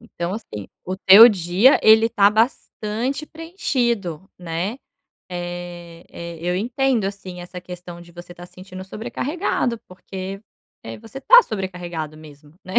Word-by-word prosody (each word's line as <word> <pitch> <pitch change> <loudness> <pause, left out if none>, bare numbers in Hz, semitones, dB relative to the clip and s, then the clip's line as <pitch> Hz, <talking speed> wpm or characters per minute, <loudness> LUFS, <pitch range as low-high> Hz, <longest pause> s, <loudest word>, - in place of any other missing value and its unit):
Então, 180 -6 -5
assim, 105 - -8 0.2
o 185 +1 -4
teu 200 +5 +9
dia, 190 - +3
ele 220 +1 +6
tá 205 -3 +4
bastante 230 +4 -2
preenchido, 240 - -3
né? 175 +5 -4 0.5
Eh 175 -1 -7
eh, 170 -1 -8
eu 175 +1 -1
entendo, 245 +2 0
assim, 195 -2 -7
essa 180 +1 -9
questão 180 -1 -10
de 170 0 -16
você 175 +1 -11
estar 175 0 -11
sentindo 185 +1 -11
sobrecarregado, 240 - -3
porque, 190 +1 -8 0.4
eh, 115 - -8
você 225 +4 -10
tá - - +8
sobrecarregado 175 -6 -5
mesmo, 150 -1 -16
né? 185 - -9
190 Hz, 135 wpm, -21 LUFS, 175-225 Hz, 0.5 s, teu